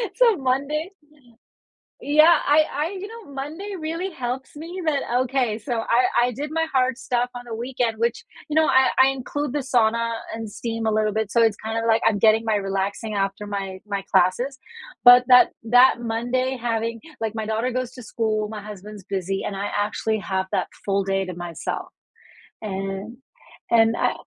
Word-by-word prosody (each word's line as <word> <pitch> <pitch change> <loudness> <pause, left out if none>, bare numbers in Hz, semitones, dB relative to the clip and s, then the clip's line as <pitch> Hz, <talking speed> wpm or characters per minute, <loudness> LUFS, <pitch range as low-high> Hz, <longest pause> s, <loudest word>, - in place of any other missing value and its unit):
So, 470 -5 +4
Mondays 280 +6 -1
mm, 295 - -30 0.9
yeah, 305 +4 +6
I 300 +2 +6
I 320 +7 -2
you 400 - -6
know, 450 -8 -12
Monday 315 +9 -6
really 330 +4 -3
helps 260 -5 -5
me 335 +5 -7
that 285 -3 +1 0.2
Okay, 245 -4 0
so 245 +3 -4
I 235 +2 +2 0.2
I - - -2
did 285 +5 -5
my 325 0 0
hard 255 -1 +2
stuff 245 -2 -1
on 245 - -6
the 230 - -6
weekend, 240 -1 -2
which, 235 0 0 0.3
you 300 - -2
know, 315 0 +5
I 265 -2 +4
I 265 - +5
include 275 +2 -3
the 295 - 0
sauna 230 -3 +1 0.2
and 225 -1 -6
steam 225 0 -3
a - - +2
little 215 -1 +1
bit 220 -1 -2
so 235 +1 +4
it's 220 -3 +2
kinda, 225 +1 -2
like, 225 0 +3
I'm 220 -2 +2
getting 220 +2 +4
my 220 -1 +1
relaxing 195 +2 -2
after 195 0 -2
my 195 -2 -5
my 200 -2 -3
classes, 245 +10 +2 0.5
but 245 0 +9
that 250 -1 +7 0.2
that 245 +3 +6
Monday 245 +3 -1
having 230 -1 -2 0.2
like, 220 -1 -2
my 220 -1 -3
daughter 220 +4 -1
goes 255 0 -3
to 255 - -10
school, 215 -2 -1
my 215 -1 -6
husband's 210 0 -9
busy 195 0 -2
and 200 - -4
I 200 +1 -3
actually 215 +1 -1
have 190 -1 -2
that - - 0 0.2
full 200 0 +1
day 195 0 0
to 185 -1 -6
myself. 175 -1 -5 0.7
And 195 +2 -5 0.5
and 225 0 +4
I - - +1
230 Hz, 185 wpm, -23 LUFS, 210-265 Hz, 0.9 s, but